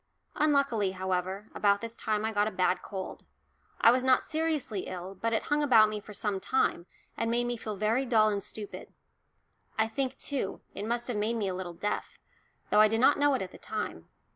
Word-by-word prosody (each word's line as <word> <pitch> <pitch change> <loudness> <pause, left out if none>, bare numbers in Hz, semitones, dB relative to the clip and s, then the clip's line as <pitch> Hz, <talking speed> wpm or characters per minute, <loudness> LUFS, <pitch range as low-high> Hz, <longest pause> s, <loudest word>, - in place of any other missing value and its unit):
Unluckily, 275 -10 +2
however, 190 +2 -3
about 200 -1 +3
this 230 +1 -6
time 215 -1 -1
I 220 - 0
got 205 -1 +2
a - - -2
bad 185 0 +1
cold. 190 -2 -6 0.6
I 230 - +7
was 255 +1 +2
not 260 -1 +4
seriously 310 - -1
ill, 185 +1 -6
but 230 +4 -2
it 225 - 0
hung 295 0 +1
about 225 -7 +6
me 215 0 -3
for 210 - -12
some 205 -1 -2
time 185 -6 0 0.3
and 230 - -1
made 240 +1 +2
me 240 0 -1
feel 215 -2 -5
very 215 +6 +1
dull 220 -4 +4
and 200 -2 -2
stupid. 210 -2 -7 0.9
I 220 0 +3
think, 260 +3 -2
too, 275 -9 -3
it 205 - -5
must 235 +1 -1
have 245 -4 -2
made 215 +3 0
me 215 -4 -1
a - - -2
little 180 -2 -5
deaf, 205 +4 -3 0.5
though 210 - +6
I 215 - +8
did 225 +1 0
not 275 +4 +5
know 290 -1 +4
it 255 - -1
at 185 - -8
the - - -13
time. 210 - -5
215 Hz, 215 wpm, -29 LUFS, 200-240 Hz, 0.9 s, I